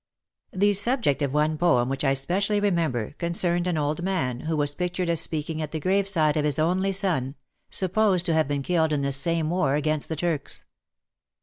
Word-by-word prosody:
The 205 +2 +2
subject 205 - +1
of 140 -2 0
one 150 +1 0
poem 125 -9 +3
which 135 +2 -3
I 135 -1 +2
specially 195 +9 0
remember, 165 - -1
concerned 175 +1 0
an 175 -3 -1
old 150 +2 -1
man, 165 -10 -2
who 160 +2 -3
was 145 -1 0
pictured 180 +2 -3
as 170 -1 +3
speaking 155 0 -1
at 155 -1 -5
the 160 - -2
graveside 185 -3 +1
of 150 - +1
his 150 0 +1
only 185 +5 +1
son, 170 -9 0 0.3
supposed 190 -1 +1
to 170 - +1
have 160 -3 +2
been 140 -1 -2
killed 160 -1 +1
in 140 -2 -1
this 140 -1 +1
same 165 +2 0
war 145 -6 +1
against 150 0 -1
the 160 - -2
Turks. 160 -2 -3
160 Hz, 195 wpm, -25 LUFS, 145-180 Hz, 0.3 s, poem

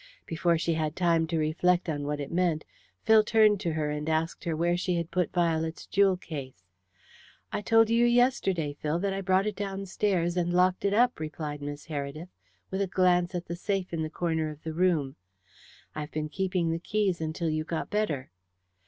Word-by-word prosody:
Before 170 +1 +1
she 165 +1 0
had 155 -1 -1
time 170 -2 +2
to 165 0 -1
reflect 175 +4 +1
on 145 -3 -2
what 150 0 -2
it 140 - -5
meant, 170 -3 +1 0.4
Phil 220 -1 +6
turned 215 -2 +4
to 170 -5 -2
her 150 -1 -1
and 150 +1 -3
asked 160 +3 -1
her 165 -2 -1
where 170 +2 +1
she 180 0 -1
had 170 -1 -3
put 180 0 0
Violet's 160 -2 0
jewel 195 -1 +3
case. 135 - -8 0.9
"I - - -1
told 225 +1 +4
you 230 +1 +4
yesterday, 240 - +2
Phil, 150 +2 -2
that 195 +2 -1
I 195 - -3
brought 190 +1 +2
it 210 -1 -2
downstairs 195 -3 -1
and 175 0 +1
locked 185 +2 +3
it 200 - +2
up," 245 +2 +3
replied 155 -1 -5
Miss 145 0 -6
Heredith, 155 +2 -5 0.4
with 190 +1 -1
a 200 - +1
glance 180 -1 +2
at 175 0 -3
the 170 - -5
safe 190 0 -2
in 165 - -1
the 155 - -2
corner 160 -2 -1
of 150 0 -10
the 160 0 -4
room. 160 -6 +1 0.8
"I - - -5
have 150 0 -5
been 155 0 -3
keeping 180 0 -1
the 165 - -1
keys 195 -2 0
until 160 +1 -2
you 155 0 -1
got 160 0 -4
better." 165 - -1
170 Hz, 200 wpm, -28 LUFS, 155-190 Hz, 0.9 s, Phil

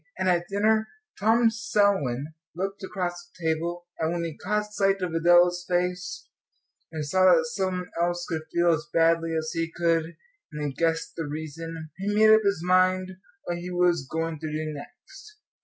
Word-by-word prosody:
And 185 - -1
at 175 -1 +2
dinner 215 +2 +2 0.3
Tom 225 +2 +4
Selwyn 195 - 0 0.2
looked 195 +3 -4
across 175 -3 -4
the 175 -1 -11
table, 170 +2 -2
and 160 0 0
when 170 0 -2
he 165 -3 -4
caught 210 +2 -2
sight 195 -1 +2
of 175 -2 -2
Adela's 175 +1 +4
face, 180 0 -2 0.6
and 155 -2 -4
saw 185 +6 +3
that 245 +5 +4
some 185 -2 -1
one 180 - -10
else 175 0 0
could 160 -2 -2
feel 170 0 +3
as 155 -2 -1
badly 165 0 +2
as 155 0 -2
he 165 0 -2
could, 165 -1 0 0.3
and 150 0 -4
he 140 - -3
guessed 165 +2 -1
the 165 -3 -4
reason, 160 +1 -6
he 205 +2 -1
made 215 0 +7
up 220 - +6
his 200 -5 0
mind 185 +1 +3 0.3
what 175 0 -3
he 175 +1 -6
was 175 -5 +1
going 160 -1 -3
to 155 0 -5
do 155 0 -3
next. 425 - -12
175 Hz, 180 wpm, -26 LUFS, 165-190 Hz, 0.6 s, made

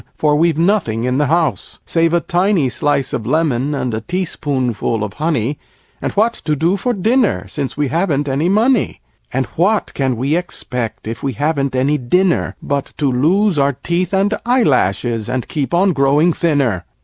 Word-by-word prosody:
For 150 -1 +2
we've 165 0 +2
nothing 165 - +1
in 125 +2 0
the 150 - +2
house, 160 -2 0
Save 165 -1 +1
a 170 - +2
tiny 175 -5 +1
slice 145 0 0
of 110 - -3
lemon 145 -1 +1
and 125 -4 -2
a 110 - -2
teaspoonful 130 - -2
of 105 - -4
honey, 145 -4 -1 0.4
And - - -2
what 225 +3 +2
to 150 - +1
do 165 +6 +1
for 245 +6 -1
dinner 220 - +1
since 140 -2 -5
we 145 -2 0
haven't 155 -3 0
any 140 +6 0
money? 225 +3 +2 0.3
And 130 +1 0
what 200 +6 +1
can 130 -3 -1
we 135 +6 0
expect 125 -11 -4
if 115 - -5
we 135 -1 -2
haven't 140 +1 -1
any 140 +4 +1
dinner, 180 +9 +1
But 140 -1 -2
to 140 -3 +1
lose 170 +7 +2
our 140 0 +2
teeth 170 +7 -2
and 200 +2 +2
eyelashes 125 - +1
and 125 -1 -2
keep 145 -3 -3
on 185 +2 +3
growing 145 +4 +3
thinner?" 140 - 0
150 Hz, 175 wpm, -17 LUFS, 130-175 Hz, 0.4 s, on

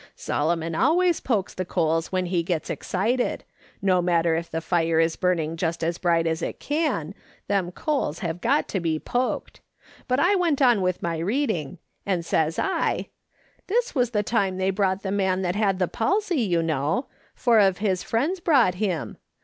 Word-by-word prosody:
" - - -32
Solomon 165 +2 -1
always 345 - +3
pokes 205 -6 -1
the 185 - -3
coals 165 -2 0
when 185 -1 0
he 175 -1 0
gets 170 -1 -2
excited; 230 +7 -1 0.4
no 185 -2 +3
matter 170 -1 +2
if 165 +1 -3
the 160 - -2
fire 165 -1 +1
is 165 0 +2
burning 165 -3 0
just 165 -1 -2
as 165 +1 -1
bright 170 -2 +2
as 160 0 -1
it - - -4
can, 290 - -1 0.3
them 190 -3 0
coals 275 - -1
have 170 0 -4
got 275 +6 +2
to 195 - -1
be 165 -2 0
poked 245 +10 -3 0.5
But 255 0 +1
I 355 +7 +4
went 345 -7 +1
on 245 -7 +4
with 185 -1 -1
my 165 -1 -1
reading, 185 - -1 0.3
and 180 -4 -1
says 160 -1 0
I: 385 - -1 0.2
" - - -36
' - - -37
This 480 +5 0
was 250 -4 +1
the 210 -3 0
time 200 -4 0
they 190 +1 +1
brought 190 -1 0
the 190 - -2
man 190 -2 +1
that 180 0 -1
had 200 -3 +1
the 180 -1 +1
palsy, 365 - 0
you 175 -6 +1
know; 155 - 0 0.3
four 235 -4 +3
of 195 -3 +4
his 195 -3 0
friends 295 +12 -1
brought 270 - +4
him. 180 -8 -2
185 Hz, 190 wpm, -24 LUFS, 165-240 Hz, 0.5 s, I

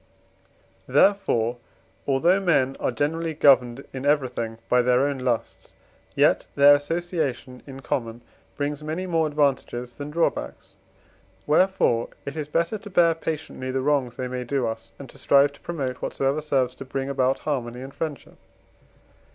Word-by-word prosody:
XIV. - - -12
Therefore, 120 - +3 0.5
although 165 +8 +3
men 145 -8 +2
are - - 0
generally 160 +6 -2
governed 130 -3 +4
in 130 0 -5
everything 130 -6 0
by 125 - +4
their 125 +1 +3
own 140 -1 0
lusts, 125 -3 -3 0.4
yet - - +3
their 140 +1 +8
association 145 -4 -2
in 135 -1 -9
common 120 -2 -3 0.4
brings 145 0 -2
many 160 +5 -3
more 165 -3 +1
advantages 135 -4 -1
than 145 +3 -7
drawbacks. 165 +2 -2 0.7
Wherefore 150 -8 +2 0.2
it 140 - -5
is 150 -2 -4
better 170 +7 -1
to 205 - -10
bear 170 -3 +4
patiently 155 -5 -5
the 130 0 -1
wrongs 135 -4 0
they 130 - -3
may 125 0 -4
do 130 +1 -1
us, 115 0 -5
and 140 - -10
to - - -15
strive 140 0 +4
to - - -19
promote 135 -7 -4
whatsoever 135 +3 -1
serves 135 -4 0
to 135 - -8
bring 135 0 -3
about 135 -1 +1
harmony 125 -4 -3
and 135 +1 -9
friendship. 155 -3 -6
140 Hz, 155 wpm, -24 LUFS, 125-155 Hz, 0.7 s, their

